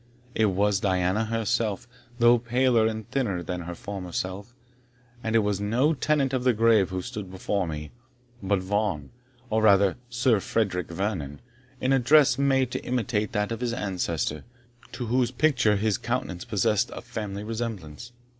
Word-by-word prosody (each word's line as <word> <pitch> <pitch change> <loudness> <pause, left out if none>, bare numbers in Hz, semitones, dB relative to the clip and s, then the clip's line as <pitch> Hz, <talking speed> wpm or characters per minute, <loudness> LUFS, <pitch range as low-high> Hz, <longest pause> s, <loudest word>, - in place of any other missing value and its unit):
It 110 - +3
was 100 +1 +1
Diana 95 +2 +1
herself, 115 0 -1 0.3
though 120 0 +5
paler 120 -1 +2
and 110 -1 -4
thinner 105 -10 -1
than 90 0 -4
her 85 +1 -6
former 95 -1 -7
self; 95 +6 -4 0.7
and 115 0 -1
it 115 - +4
was 100 -1 -1
no 125 +10 +2
tenant 140 -2 +1
of 130 -1 0
the 125 -1 +4
grave 110 -3 +4
who 95 -1 -3
stood 105 -6 -6
beside 95 0 -2
her, 75 -1 -5 0.5
but 100 +1 +1
Vaughan, 95 -5 -2 0.4
or 110 +1 +2
rather 100 -2 +4
Sir 120 -2 +2
Frederick 95 -4 -1
Vernon, 85 -6 -3 0.4
in 130 +1 +1
a 135 - +4
dress 135 0 +5
made 135 -2 +2
to - - -4
imitate 115 -4 -1
that 105 0 -1
of 115 - -4
his 120 -2 -1
ancestor, 85 - -2 0.5
to 125 - -5
whose 120 +1 +1
picture 125 -5 +2
his 105 0 0
countenance 120 -7 -3
possessed 110 +2 +1
a - - -6
family 105 -4 -5
resemblance. 110 -4 -5
110 Hz, 165 wpm, -26 LUFS, 95-120 Hz, 0.7 s, though